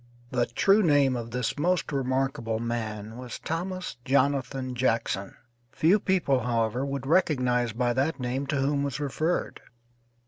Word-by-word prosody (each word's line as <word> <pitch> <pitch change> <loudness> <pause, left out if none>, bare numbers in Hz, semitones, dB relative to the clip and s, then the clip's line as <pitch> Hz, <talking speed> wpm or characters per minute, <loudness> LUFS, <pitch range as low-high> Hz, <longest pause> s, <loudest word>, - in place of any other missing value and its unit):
The 125 -2 +1
true 195 - +4
name 145 -7 +4
of 115 -1 -4
this 125 +3 -2
most 175 +1 +1
remarkable 130 -4 -1
man 110 -2 -4
was 125 -2 -7
Thomas 180 +1 -4
Jonathan 135 -1 +1
Jackson; 115 -5 -1 0.4
few 175 +6 +3
people, 175 -10 +2
however, 115 +1 0
would 140 -1 -3
recognize 125 -7 +2
by 120 +2 0
that 140 +5 0
name 130 +2 -2
to 145 - -1
whom 140 +1 +1
was 140 -1 -2
referred. 150 +4 -1
130 Hz, 140 wpm, -27 LUFS, 120-145 Hz, 0.4 s, true